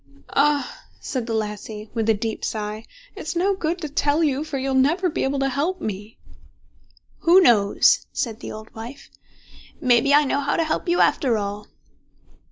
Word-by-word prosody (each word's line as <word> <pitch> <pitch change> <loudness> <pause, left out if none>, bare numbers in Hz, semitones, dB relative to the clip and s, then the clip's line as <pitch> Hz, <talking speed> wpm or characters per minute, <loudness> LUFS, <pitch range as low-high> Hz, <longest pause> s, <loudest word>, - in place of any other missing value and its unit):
"Ah!" 285 -1 +1 0.2
said 250 -3 -4
the 230 - -2
lassie, 210 0 -5
with 225 -1 -1
a 220 - +4
deep 220 +2 -4
sigh, 215 0 -4 0.3
"it's 335 -5 -5
no 380 +4 +2
good 340 -2 -2
to 310 - -3
tell 295 +2 +1
you, 285 -1 +1
for 310 -3 -4
you'll 270 0 -2
never 325 +8 +2
be - - -2
able 270 +1 0
to 270 0 +1
help 305 +8 -1
me." 210 +1 -6 1.0
"Who 345 +3 +6
knows?" 215 - +4
said 225 -2 -3
the - - -7
old 215 0 -10
wife. 235 +5 -10 0.7
"May 245 -2 +4
be 280 - +1
I 295 +1 +6
know 280 0 0
how 285 0 0
to 330 - +2
help 315 +3 -2
you 350 - +3
after 245 -5 +2
all." 205 0 -4
270 Hz, 180 wpm, -23 LUFS, 220-305 Hz, 1.0 s, Who